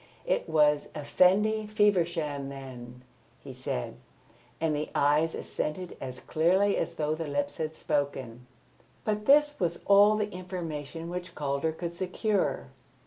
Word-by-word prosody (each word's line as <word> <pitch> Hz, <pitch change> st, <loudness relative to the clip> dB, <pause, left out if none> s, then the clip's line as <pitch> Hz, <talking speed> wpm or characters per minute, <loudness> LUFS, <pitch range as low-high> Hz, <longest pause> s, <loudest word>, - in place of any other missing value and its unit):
"It -, -, 0 dB
was 150 Hz, -2 st, +3 dB
Effendi 205 Hz, +8 st, +3 dB
Feversham, 170 Hz, -9 st, +1 dB
then?" 125 Hz, -2 st, -9 dB, 0.4 s
he 135 Hz, -, -10 dB
said, 125 Hz, -, -4 dB, 0.6 s
and 160 Hz, -2 st, +1 dB
the 150 Hz, +1 st, -3 dB
eyes 150 Hz, +3 st, +3 dB
assented 175 Hz, +4 st, -4 dB
as 130 Hz, -1 st, -6 dB
clearly 190 Hz, +6 st, +2 dB
as 170 Hz, -, -2 dB
though 155 Hz, -1 st, 0 dB
the 160 Hz, 0 st, -4 dB
lips 145 Hz, 0 st, -2 dB
had 155 Hz, 0 st, -3 dB
spoken. 130 Hz, -6 st, -2 dB, 0.6 s
But 210 Hz, 0 st, -1 dB
this 295 Hz, +1 st, +5 dB
was 170 Hz, -2 st, -1 dB
all 205 Hz, +1 st, +6 dB
the 210 Hz, -1 st, -1 dB
information 165 Hz, -4 st, -6 dB
which 180 Hz, 0 st, -6 dB
Calder 140 Hz, +2 st, -1 dB
could 170 Hz, +1 st, -5 dB
secure. 185 Hz, -, -1 dB
160 Hz, 135 wpm, -29 LUFS, 145-185 Hz, 0.6 s, all